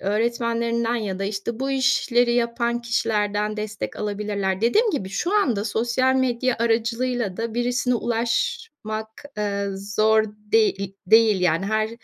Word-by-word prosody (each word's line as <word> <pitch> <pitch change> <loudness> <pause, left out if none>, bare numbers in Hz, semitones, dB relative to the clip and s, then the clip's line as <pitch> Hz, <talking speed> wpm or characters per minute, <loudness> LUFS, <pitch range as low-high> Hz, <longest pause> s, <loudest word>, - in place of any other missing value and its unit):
öğretmenlerinden 235 +2 0
ya 200 -5 -3
da, 195 - -2
işte, 215 +4 -4
bu 270 0 -1
işleri 255 -2 +2
yapan 235 0 0
kişilerden 210 -2 0
destek 210 -1 -5
alabilirler. 205 -2 -2
Dediğim 425 - +3
gibi, 195 - -3
şu 350 - -2
anda 230 - +1
sosyal 240 +4 +1
medya 255 -1 +1
aracılığıyla 235 -2 0
da 230 0 -4
birisine 245 +1 0
ulaşmak, 230 - -2 0.3
eee, 200 -1 -1 0.3
zor 220 0 +4
deği 210 -2 0
değil, 220 -2 +5
yani. 180 +2 +1
Her 215 +1 0
225 Hz, 130 wpm, -23 LUFS, 210-240 Hz, 0.3 s, değil